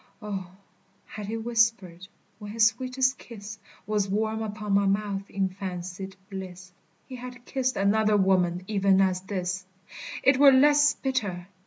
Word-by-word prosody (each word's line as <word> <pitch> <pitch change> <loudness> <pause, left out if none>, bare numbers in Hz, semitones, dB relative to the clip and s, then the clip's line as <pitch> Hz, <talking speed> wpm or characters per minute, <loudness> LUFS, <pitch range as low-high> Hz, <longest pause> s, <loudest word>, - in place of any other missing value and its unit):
O, 200 -4 -5 0.6
had 210 -2 -8
he 225 +2 -3
whispered, 225 -6 0 0.3
when 210 -1 -8
his 225 -1 +4
sweetest 255 +3 +1
kiss 220 -1 -10 0.3
Was 210 -1 0
warm 220 +2 -1
upon 210 -1 -3
my 200 0 +3
mouth 200 0 -1
in 195 -1 0
fancied 185 0 -6
bliss, 185 -2 -8 0.3
He 255 - -9
had 245 0 -10
kissed 255 -1 -1
another 210 +2 +3
woman 185 -2 +2
even 195 -2 +3
as 185 -1 +2
this, 185 -1 -3 0.6
It 270 0 +4
were 280 -1 +9
less 290 +2 +5
bitter! 205 -10 -2
205 Hz, 145 wpm, -26 LUFS, 190-230 Hz, 0.6 s, were